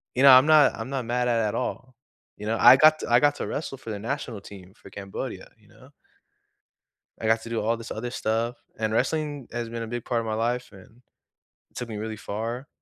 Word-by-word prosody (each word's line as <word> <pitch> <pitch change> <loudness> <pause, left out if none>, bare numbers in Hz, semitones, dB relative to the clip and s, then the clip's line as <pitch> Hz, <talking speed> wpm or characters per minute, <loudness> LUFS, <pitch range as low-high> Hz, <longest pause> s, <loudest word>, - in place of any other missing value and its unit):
you 130 - +2
know, 135 - +10
I'm 130 +2 +8
not 155 -2 +6
I'm - - -6
not 135 -3 -3
mad 125 +1 0
at 115 -1 +2
at - - -4
all, 125 0 -4 0.4
you 105 - -8
know? 115 +1 0
I - - +9
got 155 +2 +6
t - - -5
I 120 - +6
got 145 0 +3
to - - -5
wrestle 140 -2 -4
for 130 -3 -10
the 105 - -5
national 115 -2 -4
team 95 -1 -13
for - - -15
Cambodia, 100 -1 -7
you - - -25
know? - - -18 1.3
I 110 - -3
got 115 0 +2
to - - -8
do 115 -1 -2
all 115 +2 0
this 115 0 -10
other 120 +3 -4
stuff, 115 +1 -2 0.2
and 110 -1 -1
wrestling 145 +2 -1
has 120 -1 -4
been 115 0 -5
a - - -4
big 120 +1 -5
part 120 -2 0
of 115 - -6
my 110 - -2
life 120 +2 -2
and 110 +5 -17 0.7
took 125 -1 -5
me 110 - -5
really 110 +1 -5
far, 115 +7 -5
115 Hz, 235 wpm, -25 LUFS, 110-130 Hz, 1.3 s, know